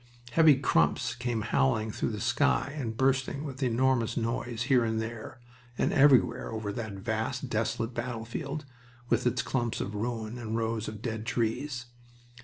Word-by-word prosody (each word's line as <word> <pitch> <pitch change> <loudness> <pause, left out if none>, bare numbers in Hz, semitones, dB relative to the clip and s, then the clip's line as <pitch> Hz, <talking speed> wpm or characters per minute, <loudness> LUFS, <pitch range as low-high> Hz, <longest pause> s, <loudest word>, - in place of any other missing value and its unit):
Heavy 160 0 +7
crumps 80 - +2
came 120 -2 -2
howling 110 -1 +1
through - - -1
the 105 -2 -4
sky 140 +6 +1
and 115 -7 -4
bursting 135 +2 +1
with 140 -2 -6
enormous 125 -1 +2
noise 115 0 -1
here, 125 -3 +3
there, 110 +2 -4 0.4
and - - +1
everywhere 135 -4 +4
over 110 -2 -3
that 110 -2 -4
vast, 110 +6 -3
desolate 115 +2 -1
battlefield, 125 +5 -4 0.4
with 120 +1 +2
its 120 - +1
clumps 120 -3 -1
of 100 - -3
ruin 115 +1 -3
and 115 -1 -3
rows 115 -1 -1
of 110 0 -7
dead 110 -1 -3
trees. 120 +3 -1
120 Hz, 150 wpm, -29 LUFS, 110-130 Hz, 0.4 s, Heavy